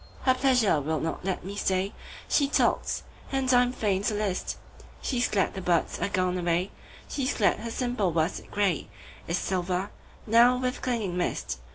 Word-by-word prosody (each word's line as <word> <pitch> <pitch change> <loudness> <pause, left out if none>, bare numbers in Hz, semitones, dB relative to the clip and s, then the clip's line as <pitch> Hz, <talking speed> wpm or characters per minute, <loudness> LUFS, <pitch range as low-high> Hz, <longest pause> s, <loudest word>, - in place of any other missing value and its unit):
Her 260 - +5
pleasure 250 - +3
will 155 +2 -1
not 160 - -3
let 185 -1 -2
me 200 +1 -5
stay. 190 0 0 0.3
She 285 - +3
talks 280 - +1 0.3
and 265 -1 +1
I 245 - +7
am 245 0 +1
fain 205 -6 0
to 215 - +1
list:She's 215 +5 -3
glad 195 -2 +1
the 190 - -5
birds 175 -2 +1
are 180 - 0
gone 185 -2 0
away, 175 +2 0 0.4
She's 275 -1 -1
glad 210 - +3
her 230 +2 -5
simple 240 -6 0
worsted 160 +2 -1
grayIs 195 -7 0 0.5
silver 185 +2 -1 0.3
now 235 +3 +6
with 255 0 -2
clinging 225 -8 -1
mist. 175 - -2
200 Hz, 165 wpm, -27 LUFS, 180-245 Hz, 0.5 s, I